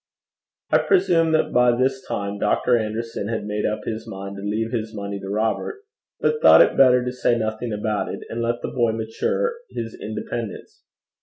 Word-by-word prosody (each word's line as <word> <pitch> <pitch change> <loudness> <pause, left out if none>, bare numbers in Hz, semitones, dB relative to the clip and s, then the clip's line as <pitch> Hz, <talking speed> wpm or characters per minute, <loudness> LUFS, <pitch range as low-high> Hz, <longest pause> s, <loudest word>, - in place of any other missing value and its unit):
I - - +5
presume 170 - +3
that 155 - +1
by 125 -1 +4
this 130 +1 0
time 100 0 -3
Doctor 125 - +2
Anderson 110 -1 -3
had 115 -2 -3
made 105 0 -1
up 105 0 -2
his 110 +1 -4
mind 100 -1 -7
to - - -7
leave 110 +3 -2
his 110 -2 -3
money 100 -1 -4
to 95 - -7
Robert, 110 - -2 0.4
but 460 0 +1
thought - - +9
it - - 0
better 125 -2 +5
to 125 - -1
say 125 -1 +1
nothing 110 +1 -3
about 105 0 -2
it, - - -6
and 115 - -4
let 120 +1 -1
the - - -2
boy 120 -3 +1
mature 110 - -1 0.2
his 115 -1 -5
independence. 110 -1 -6
115 Hz, 185 wpm, -23 LUFS, 105-125 Hz, 0.4 s, thought